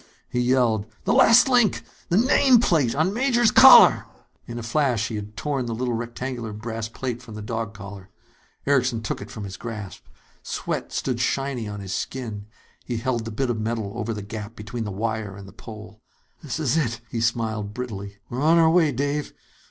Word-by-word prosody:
he 125 - -2
yelled. 120 -4 +2 0.2
"The - - +1
last 230 +4 +6
link. 245 -5 +3 0.3
The 175 - +3
nameplate 225 - +4
on 185 +5 +2
Major's 240 -1 +3
collar!" - - +8 0.4
In 120 - -6
a 120 - -5
flash, 115 -2 0
he 110 - -4
had 105 0 -7
torn 140 -4 -2
the 115 - -3
little 125 +1 -2
rectangular 120 0 -4
brass 110 +1 -5
plate 120 0 -5
from 115 -4 -11
the 110 - -6
dog 110 0 -4
collar. 100 -1 -10 0.6
Erickson 125 -5 +1
took 110 - -3
it - - -8
from 110 - -7
his 95 -2 -7
grasp. 110 -4 -7 0.4
Sweat - - -4
stood 125 -3 -2
shiny 130 -2 -1
on 105 -1 -6
his 95 -1 -5
skin. 110 -6 -5 0.4
He 120 - -4
held 120 -1 -2
the 115 - -5
bit 125 +3 -1
of 110 -2 -3
metal 110 -2 -2
over 115 -1 -3
the 105 -2 -5
gap 105 +1 -7
between 110 +2 -6
wire 110 -1 -3
and 100 0 -12
pole. 110 -1 -11 0.4
"This 150 -3 -5
is 155 -1 +1
it!" 115 -7 -1
he 115 - -2
smiled 110 -3 -1
brittlely. 100 -5 -6
"We're 125 +2 -4
on 160 +3 +4
our 160 -1 +5
way, 165 -3 +4
Dave. 145 +3 -2
115 Hz, 185 wpm, -24 LUFS, 110-135 Hz, 0.6 s, collar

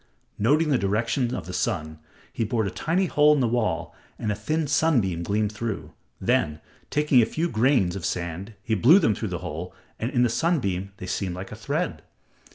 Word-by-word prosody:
Noting 150 +9 +3
the 135 -4 +3
direction 115 +5 0
of - - -5
the 90 - -7
sun, 80 -4 -2 0.3
he - - -1
bored 110 0 0
a 95 - -2
tiny 165 - 0
hole 150 -3 +4
in - - +1
the 125 - +2
wall, 110 -8 -1 0.2
and 105 - -2
a - - -1
thin 155 +10 -1
sunbeam 125 - +2
gleamed 105 +4 0
through. 110 0 -5 0.3
Then, 75 0 +1 0.3
taking 150 -4 +4
a - - +4
few 165 +7 -1
grains 115 - +2
of 95 - -6
sand 90 +5 -4
he 110 - -1
blew 125 - +6
them 155 - +3
through 110 - -4
the 90 - -3
hole 85 +5 -6 0.2
and 115 - -1
in 125 -3 +2
the 120 - +3
sunbeam 100 - 0
they - - -7
seemed 90 -1 -2
like 95 +1 -7
a - - -6
thread. 145 +10 -2
110 Hz, 200 wpm, -25 LUFS, 95-140 Hz, 0.3 s, blew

